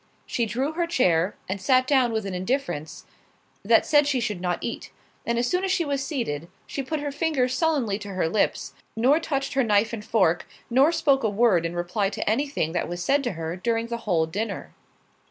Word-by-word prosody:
She 235 -2 -1
drew 260 +7 -1
her 340 +1 -1
chair, 185 - +2
and 190 +1 -4
sat 255 +5 +3
down 260 -3 +3
with 220 -2 -2
an 195 - -4
indifference, 185 - -3 0.6
that - - +4
said 295 -1 +4
she 275 -3 +1
should 210 -6 -3
not 180 -1 0
eat; 235 - -5 0.4
and 235 0 +1
as 240 +1 +1
soon 360 +7 0
as 385 - 0
she 345 -2 +1
was 280 -2 -1
seated, 170 - -3 0.2
she 275 - -4
put 295 +3 -3
her 290 -1 -3
fingers 280 -4 0
sullenly 280 - +1
to 205 -2 -7
her 180 - +1
lips, 200 +5 0 0.2
nor 260 +7 +4
touched 275 -4 -2
her 270 -1 +2
knife 215 0 +2
and 215 -2 -5
fork, 185 -6 +1 0.2
nor 270 +6 +5
spoke 290 -5 +2
a 220 - +2
word 200 -6 +3
in 170 - -7
reply 180 +4 -1
to 200 - -5
any 245 +8 +1
thing 160 - -2
that 175 0 -2
was 175 0 -4
said 280 +8 +2
to 245 - -1
her 165 0 -4
during 230 +4 -1
the 235 - -2
whole 165 -3 +3
dinner. 205 +8 -4
230 Hz, 215 wpm, -25 LUFS, 185-275 Hz, 0.6 s, nor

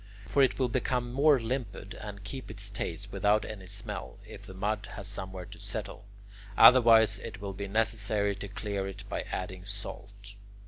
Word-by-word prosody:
For 140 - +2
it 130 - +4
will 130 - +2
become 120 0 -1
more 145 +2 +5
limpid, 115 -4 -4
and 100 -2 -8
keep 130 +6 -6
its 100 -1 -4
taste 100 0 -4
without 105 +2 +2
any 95 -4 -8
smell, 100 +2 -5
if - - -11
the 95 - -10
mud 105 +2 -1
has 100 -4 -7
somewhere 95 -2 -5
to - - -12
settle; - - -5 0.5
otherwise 115 -3 +8
it 110 -4 -7
will 100 -1 -5
be 100 +1 -5
necessary 105 -1 +1
to 100 - -6
clear 100 -1 -3
it 100 +1 -7
by - - -2
adding 95 0 -4
salt. 100 0 -7
100 Hz, 175 wpm, -30 LUFS, 100-115 Hz, 0.5 s, otherwise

